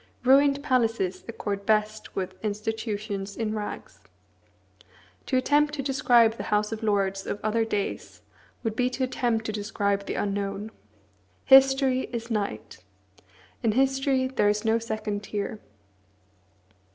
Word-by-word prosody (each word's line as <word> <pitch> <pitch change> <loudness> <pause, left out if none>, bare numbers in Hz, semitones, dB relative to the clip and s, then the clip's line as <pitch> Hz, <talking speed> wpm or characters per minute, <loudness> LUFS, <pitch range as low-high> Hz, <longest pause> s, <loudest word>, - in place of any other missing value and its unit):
Ruined 275 +2 +4
palaces 225 -9 0
accord 205 -3 -4
best 215 +1 0
with 185 -1 -3
institutions 210 -1 -3
in 220 -2 -2
rags. 210 -1 -6 1.3
To 260 - +1
attempt 295 +3 +2
to 275 - -3
describe 240 -4 +3
the - - -5
House 210 +1 +1
of 225 0 -4
Lords 195 -3 0
of 205 - -3
other 220 +1 +1
days 205 -3 -4 0.4
would 225 -2 -2
be 250 +2 +1
to 255 +1 -3
attempt 240 -3 0
to 220 - -2
describe 205 -1 -1
the - - -3
unknown. 200 +1 -3 0.7
History 270 -1 +5
is 235 -1 -5
night. 210 -2 -4 0.8
In 225 -4 +1
history 270 +1 +2
there 260 -5 +1
is 210 +2 -1
no 225 +1 +3
second 215 -2 -3
tier. 210 +1 -4
220 Hz, 130 wpm, -26 LUFS, 205-255 Hz, 1.3 s, History